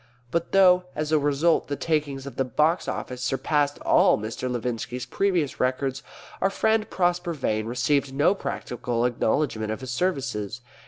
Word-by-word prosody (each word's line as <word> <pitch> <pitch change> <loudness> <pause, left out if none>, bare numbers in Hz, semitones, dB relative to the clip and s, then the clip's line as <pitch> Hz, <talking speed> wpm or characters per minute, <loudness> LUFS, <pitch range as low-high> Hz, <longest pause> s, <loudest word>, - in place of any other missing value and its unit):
But 170 0 -1
though, 180 -2 +5
as 155 0 -2
a 155 - +4
result, 145 +3 +2
the 145 - -2
takings 145 -4 -1
of 140 -4 -8
the 135 - +1
Box 150 +7 +1
Office 125 -1 -4
surpassed 140 +3 0
all - - +4
Mr. 110 +4 -4
Levinski's 125 +1 -3
previous 180 -8 0
records, 130 +1 0 0.4
our 195 - +3
friend 220 +2 +1
Prosper 175 -1 0
Vane 110 -7 -1
received 130 +3 +1
no 145 +7 +3
practical 120 - -3
acknowledgment 115 -2 0
of 110 - -4
his 130 -1 -5
services. 125 - -2
140 Hz, 155 wpm, -25 LUFS, 125-165 Hz, 0.4 s, though